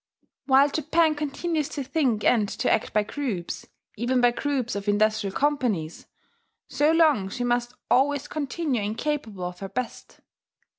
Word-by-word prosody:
While 275 +1 +6
Japan 315 +2 +2
continues 300 +1 -2
to 285 - -4
think 260 -6 0
and 215 -4 +3
to - - -1
act - - -1
by 210 - +2
groups, 210 -8 -4 0.3
even 245 +3 0
by 245 0 +5
groups 255 -1 -2
of 200 0 -5
industrial 210 -1 +1
companies, 245 - -1 0.6
so 295 +2 +2
long 305 - +3
she 245 +5 -4
must 240 0 0
always 285 +2 +2
continue 290 -4 -2
incapable 220 -2 -3
of 180 0 -5
her 195 - -6
best. 235 +4 -6
250 Hz, 145 wpm, -25 LUFS, 215-290 Hz, 0.6 s, While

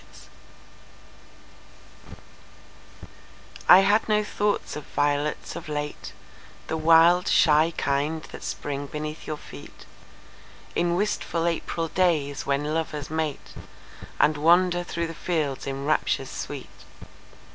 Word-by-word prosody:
Sonnet - - -15 1.5
I 180 - +10
HAD 205 +3 +2
no 210 0 +3
thought 210 0 -2
of 150 - -6
violets 145 +1 -1
of 165 - -8
late, 150 0 -5 0.5
The - - -3
wild, 165 +2 +5
shy 155 +1 +4
kind 150 +3 -1
that - - -9
spring 145 0 -4
beneath 150 +1 -6
your 155 - -3
feetIn 170 - -7
wistful 175 -4 -1
April 165 0 -2
days, 155 -7 0
when 145 +2 0
lovers 155 -3 -3
mateAnd 155 0 -3
wander 175 +3 +3
through 170 -1 -3
the 165 - -6
fields 155 -6 -2
in 135 0 -4
raptures 155 +1 0
sweet. - - -6
155 Hz, 105 wpm, -25 LUFS, 145-175 Hz, 1.5 s, I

